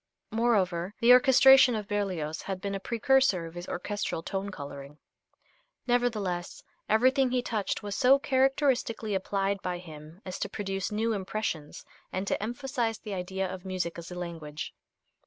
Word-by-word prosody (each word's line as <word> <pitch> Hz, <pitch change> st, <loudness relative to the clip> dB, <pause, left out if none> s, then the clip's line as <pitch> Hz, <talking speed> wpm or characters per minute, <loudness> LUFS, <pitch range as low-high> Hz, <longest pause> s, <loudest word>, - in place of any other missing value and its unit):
Moreover, 200 Hz, -5 st, +1 dB
the 240 Hz, +1 st, +7 dB
orchestration 265 Hz, 0 st, +7 dB
of 210 Hz, -2 st, -4 dB
Berlioz 185 Hz, -7 st, -2 dB
had 190 Hz, -1 st, -4 dB
been 200 Hz, +1 st, -4 dB
a 195 Hz, -, -2 dB
precursor 235 Hz, -4 st, +2 dB
of 165 Hz, -, -9 dB
his 175 Hz, +1 st, -7 dB
orchestral 180 Hz, -3 st, -3 dB
tone 195 Hz, +2 st, -3 dB
coloring. 140 Hz, -4 st, -9 dB, 0.9 s
Nevertheless, 215 Hz, -8 st, -1 dB, 0.3 s
everything 255 Hz, +4 st, +4 dB
he 250 Hz, 0 st, 0 dB
touched 215 Hz, -5 st, -2 dB
was 205 Hz, -1 st, -4 dB
so 265 Hz, +1 st, +5 dB
characteristically 265 Hz, -5 st, +1 dB
applied 195 Hz, +1 st, -1 dB
by 180 Hz, -1 st, -2 dB
him 160 Hz, -1 st, -11 dB
as 185 Hz, -, -5 dB
to 205 Hz, -, -2 dB
produce 195 Hz, -1 st, -3 dB
new 220 Hz, +2 st, 0 dB
impressions, 190 Hz, -6 st, -4 dB, 0.3 s
and 185 Hz, +1 st, -2 dB
to -, -, -1 dB
emphasize 240 Hz, 0 st, -2 dB
the 210 Hz, -2 st, -7 dB
idea 190 Hz, +1 st, -2 dB
of 185 Hz, -1 st, -7 dB
music 180 Hz, -3 st, -3 dB
as 165 Hz, -, -9 dB
a 180 Hz, -, -7 dB
language. 165 Hz, -4 st, -6 dB
200 Hz, 155 wpm, -29 LUFS, 180-235 Hz, 0.9 s, the